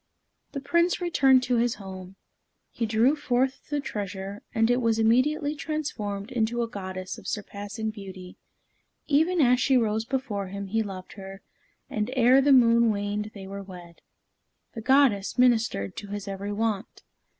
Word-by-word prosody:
The 280 - -3
Prince 340 +5 +2
returned 270 -8 +4
to 250 -1 +1
his 240 +1 +1
home. 190 -1 -9 0.6
He 230 - -2
drew 230 +6 +3
forth 265 -2 -1
the 295 0 -1
treasure, 200 -5 -5
and 225 +1 +2
it 245 +1 +2
was 230 -2 +2
immediately 285 +7 +2
transformed 265 -10 -4
into 235 0 0
a - - -2
goddess 185 -3 -6
of - - -12
surpassing 210 +1 -4
beauty. 190 -3 -10 0.7
Even 320 +5 +2
as 250 -2 +4
she 265 +1 +3
rose 220 -1 0
before 245 -6 -3
him, 200 +1 -6
he 225 +4 0
loved 190 -3 -7
her, 195 -1 -10 0.4
and 215 +1 -2
ere 255 +2 +5
the 280 +1 +3
moon 235 -3 +5
waned 205 0 -2
they 195 -1 -8
were 200 +1 -7
wed. 180 -3 -12 0.7
The 225 - -6
goddess 255 -5 +3
ministered 230 - +2
to 205 - -6
his 205 0 -6
every 200 +1 -4
want. 215 0 -3
225 Hz, 160 wpm, -26 LUFS, 200-255 Hz, 0.7 s, ere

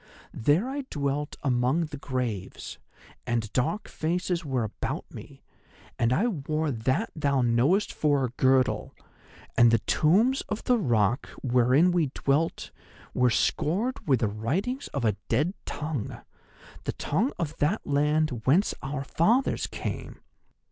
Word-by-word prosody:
There 150 - +2
I 275 +1 -4
dwelt 145 0 -2
among 130 +4 +2
the 150 -1 -8
graves, 125 -8 -4 0.5
and 115 -3 -1
dark 170 - 0
faces 175 +2 -2
were 130 -5 -1
about 110 - -4
me, - - -11 0.6
and 115 0 +2
I 190 - +2
wore 155 - -1
That 130 - -1
thou 140 -4 +1
knowest 130 - +2
for 145 -3 +2
a - - -3
girdle. 130 +1 +2 0.6
And 120 - +6
the 115 - +4
tombs 205 - +2
of 215 - -3
the 245 -2 +3
rock 120 - +1 0.2
wherein 130 +7 +4
we 175 -4 +2
dwelt 145 +4 0 0.4
were 125 0 +3
scored 195 - 0
with 130 -4 +3
the 110 - +2
writings 170 - -2
of 140 -4 -3
a 105 -2 +1
dead 150 +10 +1
tongue—the 145 -5 -7
tongue 210 - 0
of 160 -2 -3
that 165 +9 0
land 150 -3 +1
whence 175 +10 +4
our 135 0 -4
fathers 225 - +1
came. - - -6
145 Hz, 135 wpm, -27 LUFS, 125-170 Hz, 0.6 s, And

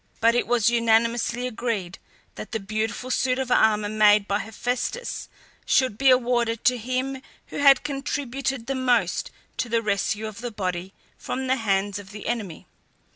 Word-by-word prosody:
But 230 +1 +4
it 245 - +1
was 235 -2 +2
unanimously 230 +1 +2
agreed 220 -7 -3 0.3
that - - -9
the 225 - 0
beautiful 220 +5 -3
suit 255 +1 +1
of 260 -2 -3
armour 215 -3 +3
made 210 -1 +4
by 200 +1 0
Hephaestus 245 - -3 0.3
should 255 -6 +2
be 270 0 +5
awarded 240 -2 +2
to 250 -1 +3
him 255 +3 -2 0.3
who - - -7
had 275 -2 +6
contributed 275 -3 -3
the 270 - -2
most 250 -3 +1 0.3
to 240 - -2
the 230 0 +1
rescue 210 +1 -1
of 215 +1 -7
the 245 - -3
body 185 -3 -4 0.2
from 265 +1 -4
the 260 +1 +1
hands 205 -2 0
of 195 -1 -11
the 210 0 -9
enemy. 215 -9 -4
230 Hz, 165 wpm, -24 LUFS, 210-255 Hz, 0.3 s, had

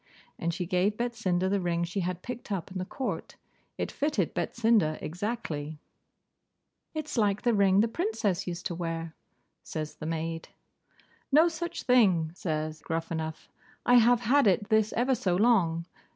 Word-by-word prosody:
And 170 - 0
she 180 +2 -3
gave 185 +4 +1
Betsinda 220 -7 0
the 200 +1 +1
ring 170 -2 0
she 175 +3 -3
had 180 -1 -3
picked 245 -2 -7
up 190 -2 -3
in 185 - -4
the 185 - -3
court. 260 +7 -4 0.4
It - - -2
fitted 280 - 0
Betsinda 220 -9 +2
exactly. 160 -4 -4 1.2
'It's 305 -5 -2
like 205 -1 +1
the 240 - +3
ring 200 -1 +4
the 225 - +3
Princess 225 - -1
used 175 0 -5
to - - -1
wear,' 165 -1 -4 0.5
says 155 -1 -5
the 155 - -6
maid. 165 0 -3 0.8
'No 310 +5 +6
such 340 +1 -4
thing,' 190 -11 +4
says 155 -3 -3
Gruffanuff, 160 -1 -4 0.4
'I 245 - +4
have 240 +1 +4
had 255 +2 +4
it 200 +2 +2
this 220 -1 +3
ever 250 +3 +2
so 190 -7 0
long. 180 -6 +3
190 Hz, 155 wpm, -29 LUFS, 165-235 Hz, 1.2 s, No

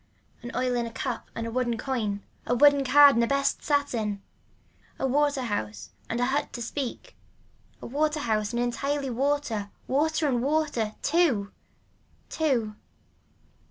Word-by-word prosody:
An 240 - -7
oil 255 0 0
in 240 -1 -1
a - - -8
cup 235 +1 -4
and 230 - -3
a 230 - -4
woolen 240 -1 0
coin, 220 -6 -2 0.2
a 245 - +2
woolen 285 +2 +6
card 285 +2 +7
and 235 - +2
a - - +1
best 275 +1 +1
satin. 235 -8 0 0.8
A - - -1
water 285 0 +1
house 110 - -4 0.2
and 230 - -2
a 245 - +2
hut 275 +3 -1
to 240 - -5
speak, 255 +1 -5 0.7
a - - -5
water 300 +3 0
house 215 -4 0
and 240 - -2
entirely 275 +3 -1
water, 250 -5 -1 0.2
water 310 +3 +1
and 245 -4 +1
water. 280 -6 0
TWO. 285 - +2 0.8
Two. 245 -9 0
255 Hz, 155 wpm, -27 LUFS, 230-285 Hz, 0.8 s, card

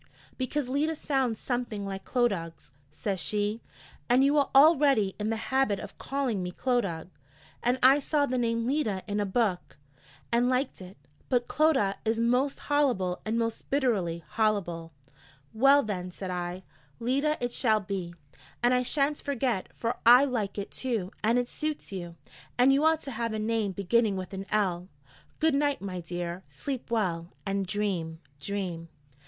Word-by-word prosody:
'Because 260 +1 -2
Leda 295 +5 0
sounds 265 -7 -1
something 240 -5 -3
like 195 -1 -6
Clodagh,' 185 - -1 0.2
says 195 +4 -3
she, 205 +7 -1 0.5
'and 250 +2 +5
you 280 +2 +3
are 285 -2 +3
al 310 +5 +8
leady 265 -10 +2
in 210 +1 -1
the 225 - 0 0.2
habit 265 -7 +3
of 205 - -10
calling 270 -8 -1
me 180 - -3
Clodagh; 195 -8 -1 0.5
and 245 +2 +2
I 270 +3 +7
saw 290 +1 +1
the 255 -2 -1
name 230 -1 0
Leda 240 -8 0
in 205 0 -1
a 205 - 0
book, 195 -3 -1 0.5
and 240 +1 +3
liked 255 -4 -1
it: 185 +1 -11 0.3
but 245 -2 +1
Clodagh 265 -10 +2
is 225 0 0
most 250 +4 +1
hollible, 250 -12 +1
most 230 0 -2
bitterly 200 - 0
hollible!' 190 -7 0 0.6
'Well, 275 +5 +5
then,' 185 -4 -4
said 185 +1 -6
I, 180 +1 -4 0.4
'Leda 275 +6 +1
it 245 0 -2
shall 220 -4 +3
be, 185 -3 -5 0.5
and 245 +1 +4
I 250 - +3
shan't 280 +3 +1
forget, 255 -7 -1
for 235 +1 -2
I 245 +4 +8
like 225 -8 -2
it, 200 - -4
too, 225 -8 -2
and 230 +3 +3
it 245 0 +1
suits 305 -1 -4
you, 175 -3 -6 0.4
and 255 +2 +6
you 280 +2 +2
ought 320 0 +3
to 275 - -6
have 230 -1 -2
a - - -2
name 215 -1 0
beginning 200 +2 +2
with 185 +1 -6
an 195 +1 -6
"L." 185 -4 0 0.5
Good 320 -1 +2
night, 285 0 +1
my 190 -2 -5
dear, 175 +1 -5
sleep 265 -5 -5
well, 180 -8 0 0.2
and 195 -1 -1
dream, 180 -5 -2 0.2
dream.' 175 -1 -4
225 Hz, 165 wpm, -28 LUFS, 190-260 Hz, 0.6 s, al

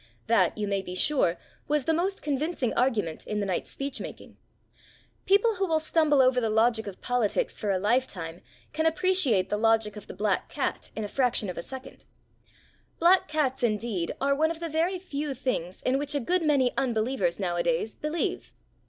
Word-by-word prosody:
That, 220 -6 +3
you 210 -1 -2
may 200 -1 0
be 180 -1 -7
sure, 185 - +2 0.3
was 295 -2 +1
the 325 - +2
most 375 +4 -1
convincing 295 -3 -1
argument 220 -10 0
in 210 - -2
the 200 - -1
night's 185 -2 -2
speech 275 -1 -5
making. - - -9 0.9
People 405 +2 +4
who 385 0 0
will 320 -2 +2
stumble 310 -3 +3
over 255 -1 +3
the 225 - 0
logic 220 0 +2
of 195 - -8
politics 245 -4 0
for 210 - -2
a 195 - +2
lifetime 185 -6 -1 0.3
can 315 +1 +1
appreciate 320 - +2
the 210 - +1
logic 225 -2 +2
of 210 - -10
the - - -9
black 205 -2 0
cat - - -3
in 220 - -3
a - - -2
fraction 245 -5 0
of - - -11
a - - -2
second. 265 +8 -9 0.9
Black 355 +3 +5
cats, 290 -4 0
indeed, 215 -6 -1
are 280 +1 +2
one 315 +3 +2
of 330 -1 -4
the 335 -1 -4
very 330 +5 0
few 295 -6 -4
things 210 -9 -3
in 260 +2 +2
which 290 0 -2
a - - +2
good 355 +8 +1
many 280 -5 +2
unbelievers 230 -7 0
nowadays 195 +5 0
believe. 305 +2 -2
255 Hz, 190 wpm, -27 LUFS, 210-305 Hz, 0.9 s, Black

